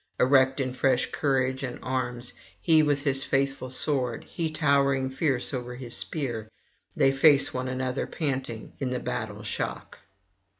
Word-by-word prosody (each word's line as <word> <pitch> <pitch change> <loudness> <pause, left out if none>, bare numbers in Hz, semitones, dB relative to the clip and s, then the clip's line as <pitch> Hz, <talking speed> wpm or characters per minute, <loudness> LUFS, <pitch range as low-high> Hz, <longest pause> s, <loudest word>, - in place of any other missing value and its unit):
Erect 130 +1 +4
in 130 -2 -1
fresh 130 0 +1
courage 130 -2 0
and 130 -3 -4
arms, 125 -2 -2 0.3
he 160 -2 +5
with 145 -2 +1
his 135 -2 +2
faithful 135 -1 -1
sword, 130 -2 0
he 165 -2 -3
towering 140 -3 +2
fierce 135 -2 -1
over 125 -1 -4
his 125 -2 -3
spear, 120 -8 -2 0.5
they 135 - +4
face 140 +1 +5
one 130 0 -3
another 130 0 -2
panting 135 -7 -4
in 135 - -1
the 125 0 -2
battle 105 -3 -4
shock. 105 - -4
130 Hz, 145 wpm, -27 LUFS, 125-140 Hz, 0.5 s, he